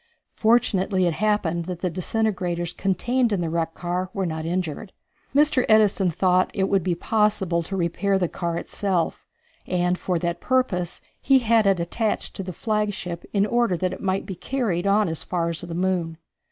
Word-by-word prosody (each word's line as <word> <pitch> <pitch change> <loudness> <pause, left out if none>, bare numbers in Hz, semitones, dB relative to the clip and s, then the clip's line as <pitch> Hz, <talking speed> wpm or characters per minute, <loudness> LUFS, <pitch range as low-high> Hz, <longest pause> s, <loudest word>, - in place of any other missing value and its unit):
Fortunately 210 -5 +2
it 170 - +1
happened 180 -4 0
that 180 -1 -6
the 180 - 0
disintegrators 180 -2 -1
contained 235 +6 0
in 200 - +1
the 165 -2 -2
wrecked 165 -1 -1
car 180 +1 -2
were 195 -1 0
not 160 -1 -3
injured. 180 +2 -3 0.4
Mr. 290 -3 +4
Edison 210 -3 +4
thought 185 +2 +2
that 195 - -3
it 190 - +1
would 195 -1 +3
be 175 -1 0
possible 205 -3 +1
to 190 +4 -4
repair 190 +3 +1
the 180 -2 +1
car 170 0 -3
itself, 185 -1 -2 0.4
and 180 0 0
for 180 -2 -1
that 170 +1 -2
purpose 250 -10 0 0.2
he 270 0 +5
had 230 -4 +3
it 195 -2 +3
attached 210 +6 -1
to - - -4
the 185 -1 -5
flagship 205 -3 -2
in 200 -1 +2
order 235 -4 +1
that 185 +2 -1
it - - -8
might 190 -1 -1
be 195 - -5
carried 195 -2 -2
on 205 +1 +3
as 165 -2 -3
far 170 -2 -1
as 165 - -3
the 170 -1 -6
moon. 175 -3 -1
185 Hz, 185 wpm, -24 LUFS, 170-210 Hz, 0.4 s, he